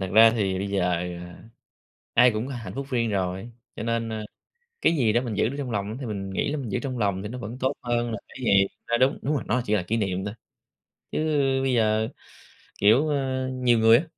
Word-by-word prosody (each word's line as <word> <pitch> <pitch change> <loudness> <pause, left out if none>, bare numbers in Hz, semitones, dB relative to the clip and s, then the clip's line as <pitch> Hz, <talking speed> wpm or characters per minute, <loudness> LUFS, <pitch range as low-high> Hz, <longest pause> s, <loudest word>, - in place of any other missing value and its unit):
thật 95 - -2
ra 115 +1 +8
thì 100 -5 0
bây 100 - -2
giờ, 95 -2 +1
à, 90 0 -4 0.8
ai 125 - +7
cũng 110 +3 -2
có 140 - -5
hạnh 115 -3 -7
phúc 135 0 -4
riêng 115 -3 +1
rồi, 95 +2 -2 0.3
cho - - -4
nên, 115 0 -1
ơ, 110 -1 -4 0.6
cái 170 - +3
gì 115 -7 +3
đó 120 - +3
mình 120 -4 -4
giữ 105 +2 +2
được 135 - -5
trong 135 -3 -3
lòng 105 +2 -3
thì 130 - -4
mình 100 -3 -4
nghĩ 95 - -1
là - - -1
mình 130 -4 -4
giữ - - +1
trong 130 -3 -4
lòng 100 -3 0
thì 105 - -5
nó 125 +3 -6
vẫn 115 +2 -6
tốt 130 +2 +1
hơn 120 -1 0
là 110 - -3
cái - - -14
gì, 100 -3 +5 0.2
a 120 - +2
đúng, 130 +2 +3
đúng 150 - 0
rồi, 140 - -2
nó 125 - +1
chỉ 105 - +1
là 100 - +2
kỷ 105 +6 -1
niệm 95 -3 -1
thôi. 100 - -4 0.8
Chứ - - 0 0.4
bây 130 -1 +1
giờ, 110 -1 +2 0.7
kiểu, 115 +9 +5
ơ, 130 -2 -1
nhiều 125 -2 +3
người 115 +1 +7
á, 140 - 0
115 Hz, 245 wpm, -25 LUFS, 100-125 Hz, 0.8 s, ra